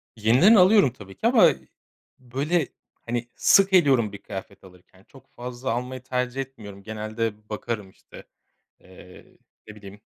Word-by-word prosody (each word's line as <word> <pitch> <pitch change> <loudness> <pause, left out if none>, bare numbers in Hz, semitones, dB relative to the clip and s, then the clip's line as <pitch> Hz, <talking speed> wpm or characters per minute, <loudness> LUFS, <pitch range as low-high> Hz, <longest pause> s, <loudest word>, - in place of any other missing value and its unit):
Yeniden 125 - +5
alıyorum 185 - +5
tabii 95 -5 -13
ki - - 0
ama, - - +6 0.7
böyle, 140 +6 -1 0.4
hani, 120 0 -3
sık 195 -1 +4
eliyorum 135 - +4
bir - - -7
kıyafet 95 -1 -10
alırken. 95 0 -19
Çok 135 +3 -19
fazla 125 +1 -5
almayı 125 +2 -4
tercih 125 +1 -3
etmiyorum. 105 -7 -11
Genelde 110 0 -5
bakarım, 105 -2 -5
işte, - - -16 0.6
eee, 90 0 -17 0.3
ne 110 - -10
bileyim, 100 -1 -13
120 Hz, 135 wpm, -24 LUFS, 105-130 Hz, 0.7 s, ama